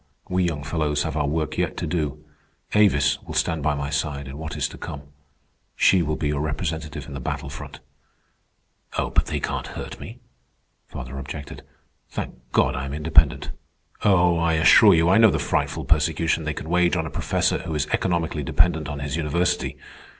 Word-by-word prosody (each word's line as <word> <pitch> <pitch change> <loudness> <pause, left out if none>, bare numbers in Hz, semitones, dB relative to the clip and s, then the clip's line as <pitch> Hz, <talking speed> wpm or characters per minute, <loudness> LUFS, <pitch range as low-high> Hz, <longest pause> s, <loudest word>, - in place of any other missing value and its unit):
We 90 0 +1
young 75 -4 -2
fellows 75 0 0
have 80 - -3
our 75 -2 0
work 75 0 -2
yet - - -1
to - - -2
do. 75 -3 -3 0.5
Avis 75 -12 +3
will - - -8
stand 80 -2 0
by 75 +1 +1
my 70 0 -3
side 70 -1 -2
in 65 - -8
what 80 0 -5
is - - 0
to - - -11
come. 75 -4 -7 0.7
She 95 - +4
will 75 -1 -1
be 75 - -2
your 75 -1 -1
representative 80 0 -3
in 70 - -8
the 70 - -5
battle 70 +2 -4
front." 70 - -9 1.2
"But - - +1
they - - -2
can't - - -3
hurt - - -7
me," - - -9 0.7
father 65 +1 -7
objected. 70 +1 -7 0.5
"Thank - - -5 0.2
God - - +2
I 65 0 -3
am 70 +1 -5
independent. 75 -1 +3 0.5
Oh, 90 -4 +4
I 85 0 +2
assure 90 +5 +7
you, 80 +1 +3
I 95 +4 +5
know 110 -1 +8
the 80 - +1
frightful 65 - -1
persecution 80 +1 +1
they 75 - -2
can - - -6
wage 90 +1 +3
on 80 -2 -1
a 80 - -6
professor - - 0
who 80 - -5
is 75 -1 0
economically 85 -4 0
dependent 80 +1 +1
on 75 0 -5
his 70 -1 -3
university. 85 +2 0
75 Hz, 185 wpm, -24 LUFS, 70-85 Hz, 1.2 s, know